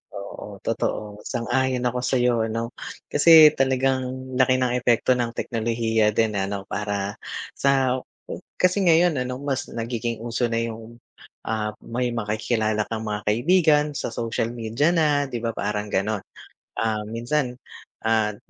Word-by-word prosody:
Oo, 100 Hz, +1 st, -8 dB
totoo, 105 Hz, -2 st, -2 dB
sang-ayon 125 Hz, +1 st, 0 dB
ako 125 Hz, 0 st, 0 dB
sa'yo. 125 Hz, -1 st, +2 dB
Ano, 115 Hz, +2 st, -3 dB, 0.4 s
kasi, 155 Hz, 0 st, +8 dB
talagang 130 Hz, -1 st, 0 dB
laki 130 Hz, 0 st, +5 dB
ng 130 Hz, -1 st, +1 dB
epekto 120 Hz, +1 st, +2 dB
ng 115 Hz, -1 st, -2 dB
teknolohiya 115 Hz, -2 st, 0 dB
din 110 Hz, -1 st, +2 dB
na, 95 Hz, -1 st, -1 dB
ano, 100 Hz, -1 st, -4 dB
para 100 Hz, -1 st, -3 dB, 0.4 s
sa 135 Hz, -2 st, +2 dB, 0.6 s
kasi 185 Hz, +2 st, +3 dB
ngayon, 170 Hz, -1 st, +4 dB
ano 125 Hz, +1 st, -5 dB
,mas 140 Hz, -2 st, -3 dB
nagiging 115 Hz, 0 st, -3 dB
uso 120 Hz, +1 st, -2 dB
na 115 Hz, -, +1 dB
'yung, 115 Hz, 0 st, -6 dB, 0.5 s
ah, 110 Hz, -1 st, -1 dB
may 120 Hz, +1 st, -2 dB
makikilala 110 Hz, -1 st, -1 dB
kang 110 Hz, 0 st, -3 dB
mga 105 Hz, 0 st, -3 dB
kaibigan 150 Hz, -, +3 dB
sa 120 Hz, -, -3 dB
social 115 Hz, 0 st, -2 dB
media 120 Hz, +7 st, 0 dB
na, 150 Hz, -4 st, +2 dB
'di 120 Hz, -, -3 dB
ba, 115 Hz, -1 st, -2 dB
parang 105 Hz, 0 st, -2 dB
gano'n. 105 Hz, +1 st, 0 dB, 0.6 s
Ah, 110 Hz, -1 st, 0 dB
minsan, 125 Hz, +3 st, -1 dB, 0.5 s
ah, 110 Hz, -2 st, +1 dB
120 Hz, 140 wpm, -24 LUFS, 110-130 Hz, 0.6 s, kasi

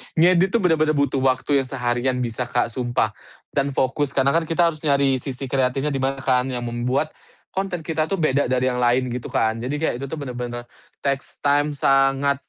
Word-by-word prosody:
Ngedit 180 Hz, +3 st, +5 dB
tuh 230 Hz, -, +3 dB
bener-bener 155 Hz, -3 st, +3 dB
butuh 140 Hz, -1 st, +1 dB
waktu 135 Hz, +2 st, +2 dB
yang 130 Hz, -, -3 dB
seharian 125 Hz, 0 st, -1 dB
bisa, 120 Hz, +1 st, -3 dB
Kak, 120 Hz, -2 st, 0 dB
sumpah. 120 Hz, -3 st, 0 dB, 0.4 s
Dan 140 Hz, -1 st, 0 dB
fokus. 140 Hz, +2 st, 0 dB
Karena 135 Hz, 0 st, +3 dB
kan 165 Hz, 0 st, +1 dB
kita 170 Hz, 0 st, +3 dB
harus 155 Hz, -, -11 dB
nyari 140 Hz, -2 st, +3 dB
sisi 130 Hz, 0 st, -6 dB
kreatifnya 135 Hz, +2 st, 0 dB
di 135 Hz, -, -2 dB
mana 135 Hz, 0 st, -1 dB
kan, 125 Hz, -1 st, +2 dB
yang 125 Hz, -2 st, -3 dB
membuat 125 Hz, +6 st, -1 dB, 0.4 s
konten 190 Hz, -3 st, -3 dB
kita 155 Hz, 0 st, -1 dB
tuh 185 Hz, +1 st, -2 dB
beda 145 Hz, -1 st, +2 dB
dari 130 Hz, 0 st, +1 dB
yang 125 Hz, -, -2 dB
lain, 125 Hz, +1 st, +2 dB
gitu 125 Hz, 0 st, -4 dB
kan. 110 Hz, 0 st, 0 dB
Jadi 125 Hz, +5 st, -3 dB
kayak 160 Hz, -, +1 dB
itu 140 Hz, -, -4 dB
tuh 160 Hz, -, -5 dB
bener-bener 120 Hz, -4 st, -5 dB, 0.4 s
takes 140 Hz, -1 st, -3 dB
time, 145 Hz, +1 st, +2 dB
sangat. 135 Hz, 0 st, +2 dB
135 Hz, 195 wpm, -22 LUFS, 125-145 Hz, 0.4 s, Ngedit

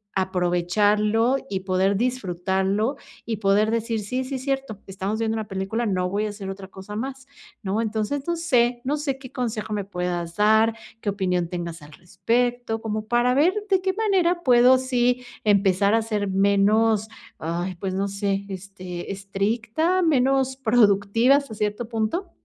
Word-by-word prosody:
aprovecharlo 205 Hz, +6 st, +2 dB
y 190 Hz, -1 st, -2 dB
poder 190 Hz, +1 st, +1 dB
disfrutarlo 200 Hz, 0 st, -1 dB, 0.3 s
y 225 Hz, -2 st, -2 dB
poder 205 Hz, +2 st, +2 dB
decir: 230 Hz, -1 st, -1 dB
"Sí, 250 Hz, +6 st, -2 dB
sí, 265 Hz, +1 st, -5 dB
es 260 Hz, -, -5 dB
cierto, 270 Hz, -6 st, -3 dB
estamos 195 Hz, +2 st, -3 dB
viendo 225 Hz, -1 st, 0 dB
una 220 Hz, -1 st, -4 dB
película, 195 Hz, +5 st, -2 dB
no 185 Hz, -2 st, 0 dB
voy 210 Hz, +2 st, -1 dB
a -, -, -4 dB
hacer 200 Hz, -2 st, -7 dB
otra 195 Hz, 0 st, -9 dB
cosa 190 Hz, +2 st, -10 dB
más", 265 Hz, +4 st, -5 dB, 0.4 s
¿no? 205 Hz, +3 st, 0 dB
Entonces, 220 Hz, +5 st, -2 dB
no 340 Hz, -, +1 dB
sé, 245 Hz, -7 st, +1 dB
no 285 Hz, +4 st, 0 dB
sé 285 Hz, -3 st, -2 dB
qué 265 Hz, -2 st, -11 dB
consejo 225 Hz, -4 st, -3 dB
me 205 Hz, -2 st, -2 dB
puedas 180 Hz, -3 st, -3 dB
dar, 220 Hz, +2 st, +4 dB, 0.3 s
qué 205 Hz, -, -1 dB
opinión 180 Hz, -3 st, 0 dB
tengas 170 Hz, -3 st, -5 dB
al 145 Hz, 0 st, -14 dB
respecto, 230 Hz, +5 st, -1 dB
como 215 Hz, -1 st, -3 dB
para 240 Hz, +1 st, +2 dB
ver 310 Hz, +7 st, +4 dB, 0.2 s
de 380 Hz, -2 st, +3 dB
qué 380 Hz, 0 st, 0 dB
manera 370 Hz, -5 st, +1 dB
puedo 250 Hz, 0 st, +6 dB
sí 250 Hz, -1 st, +1 dB, 0.2 s
empezar 200 Hz, 0 st, +3 dB
a 225 Hz, -, +3 dB
ser 210 Hz, -2 st, -2 dB
menos, 200 Hz, +3 st, +3 dB, 0.3 s
ay, 175 Hz, +3 st, -3 dB
pues 185 Hz, +2 st, -4 dB
no 195 Hz, +1 st, 0 dB
sé, 200 Hz, 0 st, -2 dB
este, 185 Hz, -2 st, -7 dB
estricta, 220 Hz, -, 0 dB
menos 265 Hz, -3 st, +2 dB
productiva 230 Hz, +1 st, +4 dB
hasta 280 Hz, -7 st, -5 dB
cierto 210 Hz, +2 st, -2 dB
punto. 230 Hz, -, -2 dB
215 Hz, 165 wpm, -24 LUFS, 195-250 Hz, 0.4 s, puedo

